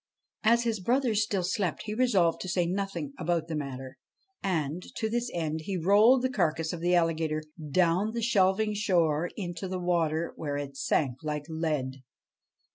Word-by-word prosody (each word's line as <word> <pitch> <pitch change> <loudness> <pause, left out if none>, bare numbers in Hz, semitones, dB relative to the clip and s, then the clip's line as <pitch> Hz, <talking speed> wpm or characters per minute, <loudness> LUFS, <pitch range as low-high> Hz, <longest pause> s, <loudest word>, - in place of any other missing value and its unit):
As 235 +2 +4
his 225 -3 -1
brothers 235 +1 +2
still 200 -3 -1
slept 185 -1 -1
he 210 -1 -4
resolved 205 -9 +2
to 185 - -4
say 175 0 +1
nothing 195 - -3
about 165 -1 0
the 165 - -3
matter, 135 -3 -6 0.4
and, 165 -3 -1
to 220 -1 -2
this 240 +1 -1
end, 160 -2 -2
he 195 -2 -2
rolled 210 +9 +5
the 260 - +2
carcase 160 - 0
of 175 - -4
the 175 +1 +3
alligator 160 -2 +1 0.3
down 180 +5 +2
the 235 -1 -2
shelving 210 0 +3
shore 175 -6 +1
into 175 -2 -4
the 185 0 -3
water, 170 -2 0
where 145 -2 -3
it 140 -1 -5
sank 135 -2 0
like 150 -1 -3
lead. 150 -5 -2
175 Hz, 170 wpm, -29 LUFS, 160-210 Hz, 0.4 s, rolled